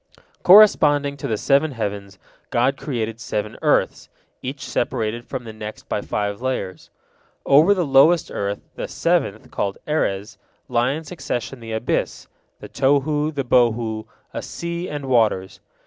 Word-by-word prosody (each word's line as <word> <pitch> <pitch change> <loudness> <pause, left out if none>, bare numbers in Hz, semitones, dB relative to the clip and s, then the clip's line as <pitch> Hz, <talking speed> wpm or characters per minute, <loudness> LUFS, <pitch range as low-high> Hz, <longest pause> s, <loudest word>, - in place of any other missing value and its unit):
Corresponding 150 -8 +6
to 140 - -4
the 110 -4 -1
seven 140 +6 +2
heavens, 100 -4 -5 0.3
God 130 +3 +2
created 115 -6 -4
seven 105 -1 -3
earths, - - +1 0.3
each 130 0 -6
separated 120 -1 -2
from 130 -2 -5
the 110 -2 -9
next 110 0 -8
by 105 - -2
five 100 +1 -3
layers. 125 -8 -4 0.6
Over 155 +9 +6
the 180 -3 0
lowest 145 +5 +4
earth, 100 0 -3
the - - -5
seventh, - - -1
called 100 -1 -2
Erez, 105 -8 -1 0.3
lie 125 +2 +1
in 160 +2 -5
succession 135 -6 -5
the 115 -1 -7
abyss, 110 +2 -2 0.3
the - - -9
Tohu, 145 +3 +1
the 140 -3 -3
Bohu, 115 -3 +1 0.3
a - - -4
sea, 170 +1 -5
and 145 -2 -5
waters. 110 -7 +1
125 Hz, 145 wpm, -22 LUFS, 110-145 Hz, 0.6 s, Corresponding